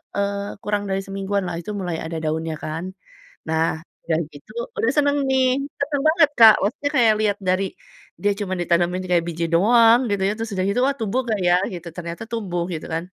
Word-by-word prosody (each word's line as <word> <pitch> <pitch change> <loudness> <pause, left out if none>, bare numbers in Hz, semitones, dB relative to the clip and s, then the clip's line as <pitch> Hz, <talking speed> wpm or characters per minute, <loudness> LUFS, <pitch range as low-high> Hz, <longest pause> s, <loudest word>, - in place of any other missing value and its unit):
eee, 200 0 -2
kurang 205 0 -1
dari 195 0 0
semingguanlah 195 -2 -2
itu 210 - -6
mulai 180 -4 -3
ada 165 0 -4
daunnya 160 +1 -2
kan. 160 +2 -4 0.7
Nah, 160 0 +1 0.3
udah 160 -1 0
gitu 145 +9 -14 0.2
udah 230 - +1
seneng 285 0 +3
nih, 260 -1 +3 0.3
seneng 280 -1 -1
banget, 315 -2 +4
Kak, 220 -2 +10
maksudnya 285 +7 -1
kayak 225 -3 +5
lihat 205 -2 +1
dari 185 +1 +1 0.5
dia 205 0 +2
cuman 190 -3 -3
ditanemin 175 +1 +1
kayak 170 -2 +3
biji 170 0 -2
doang, 230 +5 +6
gitu 200 - +1
ya. - - +1
Terus 225 -1 -4
sudah 185 -1 -1
gitu, 210 +5 +1
wah 275 0 +2
tumbuh 225 +3 0
nggak 215 -4 -1
ya 175 - +5 0.2
gitu, 175 -1 -7
ternyata 170 +2 -6
tumbuh 190 -7 -3
gitu 165 -3 -5
kan. 165 +1 -2
195 Hz, 190 wpm, -22 LUFS, 170-225 Hz, 0.7 s, Kak